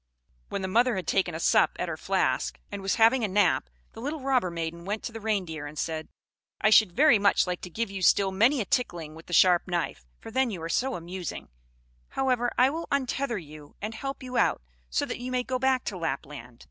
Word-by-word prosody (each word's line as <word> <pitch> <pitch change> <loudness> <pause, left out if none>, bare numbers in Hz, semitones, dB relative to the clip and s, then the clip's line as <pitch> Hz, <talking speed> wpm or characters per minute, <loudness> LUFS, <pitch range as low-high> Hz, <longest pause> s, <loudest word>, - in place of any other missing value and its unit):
When 200 - -3
the - - -1
mother 235 +5 +3
had 185 -3 -3
taken 185 -2 0
a - - -4
sup - - +3
at - - -2
her - - -3
flask, - - 0
and 200 -1 -5
was 195 0 0
having 230 +2 +4
a - - +2
nap, 205 +2 +2 0.2
the - - -10
little 290 +3 -4
robber 260 -8 +1
maiden 170 0 -5
went 205 +4 -3
to - - -4
the 225 - -7
Reindeer, 180 -9 -2
and 150 +1 -10
said, 160 +1 -3 0.5
"I 215 - +3
should 215 -3 +6
very 280 - +5
much 200 0 +3
like 180 -1 -3
to 180 - -7
give 220 +3 -3
you 195 -1 -5
still 195 +1 +4
many 230 +8 +3
a - - -2
tickling 170 - -2
with 160 +1 -13
the 175 - -7
sharp 180 0 +5
knife, 175 - -2 0.2
for 225 - -10
then 260 +1 +2
you 195 -6 -5
are 165 - -4
so 260 +9 0
amusing; 175 +1 -6 0.6
however, 250 -2 0
I 255 +2 +5
will 330 +2 -5
untether 270 -3 -1
you, 150 -4 -11
and 215 +2 -4
help 270 +3 -5
you 255 -1 -4
out, - - +2 0.3
so - - 0
that - - -5
you 250 +1 -5
may 250 -1 0
go 255 0 -2
back 260 -1 +2
to 195 - -4
Lapland. 135 -6 -5
205 Hz, 230 wpm, -27 LUFS, 170-250 Hz, 0.6 s, should